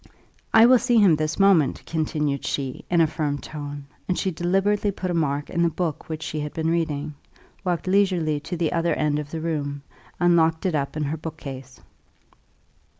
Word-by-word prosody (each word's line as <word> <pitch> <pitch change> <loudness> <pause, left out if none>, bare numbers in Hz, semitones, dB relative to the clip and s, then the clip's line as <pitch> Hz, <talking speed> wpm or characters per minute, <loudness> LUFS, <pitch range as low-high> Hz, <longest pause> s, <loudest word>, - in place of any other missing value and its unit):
I 225 0 +7
will 250 0 +6
see 240 -1 +2
him 195 -7 +6
this 155 +1 -2
moment," 190 -8 +3
continued 150 -3 -1
she, 135 -2 -3
in 175 -1 +4
a - - +6
firm 150 -2 -2
tone; 145 -1 -7 0.2
and 180 - 0
she 190 - 0
deliberately 195 +5 +1
put 185 -2 -3
a - - -1
mark 145 -3 0
in 170 - 0
the 170 - +4
book 165 -1 -3
which 160 0 -4
she 155 - -4
had 150 0 -5
been 160 0 0
reading, 155 -3 -1 0.5
walked 175 -3 -1
leisurely 185 -6 +2
to 160 +4 -5
the 165 -2 0
other 170 0 +1
end 150 -1 0
of 145 -1 -6
the 160 +1 -5
room, 145 -3 -3 0.4
and 175 -1 +4
locked 160 0 +2
it 185 - +1
up 145 0 -2
in 155 - -1
her 150 +2 -2
book 160 0 -7
case. 135 -3 -9
160 Hz, 200 wpm, -24 LUFS, 150-175 Hz, 0.5 s, I